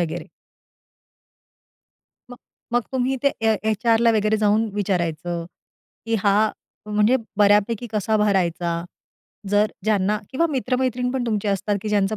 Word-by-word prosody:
वगैरे. 170 0 -3 2.0
मग 245 - -9 0.4
मग 240 0 +2
तुम्ही 260 +1 0
ते 280 - +5
ए 220 0 +3 0.2
एचआरला 230 +2 +3
वगैरे 215 +1 +2
जाऊन 215 +2 +3
विचारायचं, 175 -4 -2 0.6
की 225 - 0
हा 200 -1 +4 0.5
म्हणजे 210 +4 +3 0.2
बऱ्यापैकी 210 +3 +3
कसा 215 +1 +1
भरायचा. 175 -4 +1 0.8
जर 205 +1 +2
ज्यांना 210 -1 +1
किंवा 330 +6 +1
मित्र-मैत्रीण 250 -1 -1
पण 260 -2 -1
तुमची 210 -2 -1
असतात 200 +1 0
की 215 - -3
ज्यांचं 205 0 +1
210 Hz, 125 wpm, -22 LUFS, 200-235 Hz, 2.0 s, ते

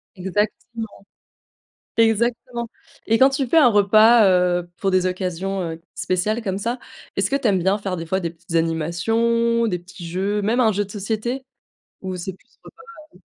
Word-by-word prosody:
Exactement. 210 +3 -3 0.9
Exactement 235 +2 +1 0.4
et 225 0 +3
quand 265 +3 +6
tu 270 0 -1
fais 255 - +1
un 290 -6 +7
repas, 215 +2 +6
heu, 180 -1 +2
pour 195 - 0
des 185 -1 +2
occasions, 185 +1 -2
heu, 165 -1 -5
spéciales 210 +6 -1
comme 195 -3 -2
ça, 235 +5 -2 0.4
est-ce - - +1
que 275 - +2
tu 270 -4 0
aimes 190 -3 +2
bien 190 +3 +2
faire 195 -3 -3
des 165 - -5
fois 190 +3 0
des 170 -2 -3
petites 170 +1 -11
animations, 225 +9 +1
des 180 -5 -1
petits 175 0 -11
jeux, 195 +4 -1
même 225 +5 +1
un 225 -3 +4
jeu 205 +1 0
de 200 - -14
société? 220 +6 -3 0.6
Ou 185 -1 -4
c'est 180 +1 -5
plus - - -28
repas, - - -15 0.4
heu - - -18
200 Hz, 180 wpm, -22 LUFS, 180-230 Hz, 0.9 s, un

